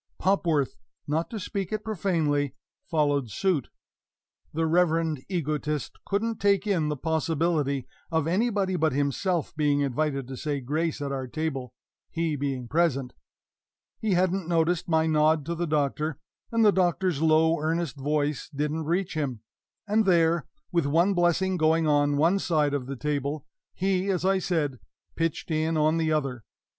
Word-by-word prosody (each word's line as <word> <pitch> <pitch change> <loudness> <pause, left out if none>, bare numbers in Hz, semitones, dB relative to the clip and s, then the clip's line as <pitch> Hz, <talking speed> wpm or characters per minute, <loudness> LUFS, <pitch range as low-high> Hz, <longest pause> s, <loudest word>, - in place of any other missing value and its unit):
Popworth 170 -7 +1 0.3
not 160 +3 -1
to 225 - -5
speak 195 -1 -4
it 215 0 -2
profanely 155 - 0 0.3
followed 145 -6 +1
suit! 165 - 0 0.8
The 165 +1 0
reverend 165 -3 +2
egotist 150 -4 -2
couldn't 220 +3 -1
take 200 -1 +3
in 175 -7 +1
the 150 - -2
possibility 160 -3 0 0.2
of 160 -3 +1
anybody 195 +1 +1
but 160 -4 +2
himself 145 +5 -1
being 145 -2 +2
invited 140 -1 -1
to 130 -1 -7
say 145 0 -2
grace 150 +4 -2
at 140 - -3
our 135 -1 -3
table, 135 -3 -4 0.3
he 165 -2 -1
being 135 -3 -3
present 140 -4 +1 0.9
he 215 -3 0
hadn't 185 0 +1
noticed 170 0 +1
my 160 -1 +3
nod 155 -1 +3
to 170 - -2
the 170 +1 -2
Doctor, 150 0 0 0.3
and 230 -1 +3
the 210 - +7
Doctor's 180 -4 +1
low, 160 +1 +4
earnest 165 -1 -1
voice 145 +1 -1
didn't 150 +2 -2
reach 175 +3 0
him 140 -8 -2 0.5
and 215 +1 +2
there, 170 -3 +3 0.2
with 170 -5 +1
one 170 +7 +3
blessing 180 +1 +2
going 160 0 +3
on 145 -1 +3
one 170 +7 +3
side 155 -6 +1
of 135 -3 -2
the 140 - -4
table, 145 +1 -2 0.3
he, 190 +1 0
as 185 -2 0
I 195 0 +3
said, 150 -8 -1 0.4
pitched 165 0 -2
in 160 +1 +1
on 155 +1 +3
the 160 -1 +1
other! 135 -6 -1
160 Hz, 155 wpm, -27 LUFS, 145-175 Hz, 0.9 s, the